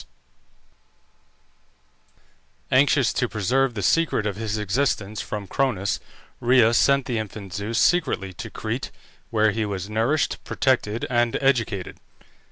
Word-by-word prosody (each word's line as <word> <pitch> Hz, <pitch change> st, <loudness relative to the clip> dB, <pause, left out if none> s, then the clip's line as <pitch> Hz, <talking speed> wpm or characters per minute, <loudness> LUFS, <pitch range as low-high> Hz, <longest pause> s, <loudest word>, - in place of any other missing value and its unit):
Anxious 135 Hz, 0 st, +4 dB
to 125 Hz, -, 0 dB
preserve 120 Hz, +5 st, 0 dB
the 100 Hz, -, -3 dB
secret 165 Hz, -, +2 dB
of 105 Hz, -2 st, -2 dB
his 110 Hz, 0 st, -3 dB
existence 105 Hz, -1 st, -1 dB
from 105 Hz, -2 st, -5 dB
Cronus, 100 Hz, -3 st, -1 dB, 0.4 s
Rhea 120 Hz, -2 st, +4 dB
sent 140 Hz, +2 st, +3 dB
the 120 Hz, -3 st, -1 dB
infant 100 Hz, -3 st, -7 dB
Zeus 105 Hz, +4 st, -3 dB
secretly 130 Hz, -, +1 dB
to -, -, -7 dB
Crete, -, -, -4 dB, 0.4 s
where 110 Hz, -1 st, +3 dB
he 110 Hz, +2 st, -1 dB
was 100 Hz, -1 st, -4 dB
nourished, 115 Hz, +8 st, 0 dB
protected, 120 Hz, -4 st, 0 dB
and 120 Hz, -1 st, +1 dB
educated. 115 Hz, -9 st, 0 dB
115 Hz, 120 wpm, -24 LUFS, 105-130 Hz, 0.4 s, Anxious